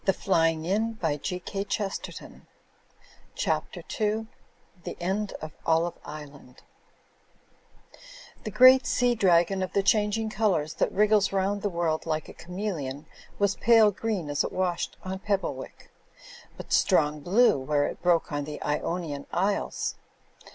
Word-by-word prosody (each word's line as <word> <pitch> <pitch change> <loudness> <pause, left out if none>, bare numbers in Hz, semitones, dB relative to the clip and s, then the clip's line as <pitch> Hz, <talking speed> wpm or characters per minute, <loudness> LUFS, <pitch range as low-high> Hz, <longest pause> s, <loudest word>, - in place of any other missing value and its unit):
Digitized 190 +4 +1
by 160 -4 0
CjOOQIC 195 +5 -4 0.9
CHAPTER - - -2 0.2
II 215 +1 0 0.6
THE - - -7
END 195 +3 -2
OF 155 - -6
OLIVE 165 +1 +2
ISLAND 145 -4 -11 1.8
The - - -4
great 255 +4 +7
sea 245 -1 +2
dragon 190 -3 +3
of 185 - -3
the 200 - +2
changing 215 +1 +1
colours 190 -8 0
that - - 0
wriggles 210 0 +3
round 195 +1 0
the 205 - 0
world 170 -3 -1
like 155 -1 -2
a - - -10
chameleon, 170 -7 -5 0.3
was 200 -1 +2
pale 225 -1 +5
green 200 -7 -3
as 145 - +1
it - - -3
washed 180 -2 -2
on 190 0 -5
Pebblewick, 190 -10 -4 0.7
but - - -6
strong 150 0 +3
blue 190 - +3
where 145 +2 +1
it - - -5
broke 170 -2 +2
on 145 -1 -2
the 150 0 -7
Ionian 150 -1 -3
Isles. 195 +3 -1
185 Hz, 130 wpm, -27 LUFS, 155-210 Hz, 1.8 s, great